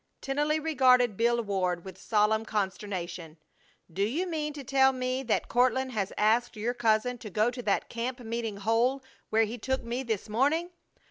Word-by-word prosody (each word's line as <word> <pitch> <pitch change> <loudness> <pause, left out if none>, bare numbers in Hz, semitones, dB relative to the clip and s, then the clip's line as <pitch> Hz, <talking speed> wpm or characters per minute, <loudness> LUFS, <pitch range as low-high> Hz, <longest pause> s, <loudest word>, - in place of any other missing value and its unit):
Tennelly 295 +3 0
regarded 255 -7 +4
Bill 235 +2 +2
Ward 185 -4 -1
with 190 -2 -8
solemn 220 0 +2
consternation. 190 -6 -4 0.6
"Do 195 - -3
you 265 - 0
mean 310 -4 -2
to 290 -2 -8
tell 265 +1 +4
me 255 0 -2
that 240 -4 0
Court 250 +1 +3
has 200 -5 -2
asked 225 +3 +2
your 225 +3 -1
cousin 240 +1 +1
to 225 -3 -8
go 215 +5 +1
to 245 0 -6
that 205 -4 0
camp 245 +2 -4
meeting 230 -3 -4
hole 230 +6 +1 0.3
where 220 +1 +3
he 230 +3 -6
took 265 +3 -2
me 235 +2 -3
this 225 -6 -3
morning? 290 +11 +1
235 Hz, 175 wpm, -29 LUFS, 210-260 Hz, 0.6 s, regarded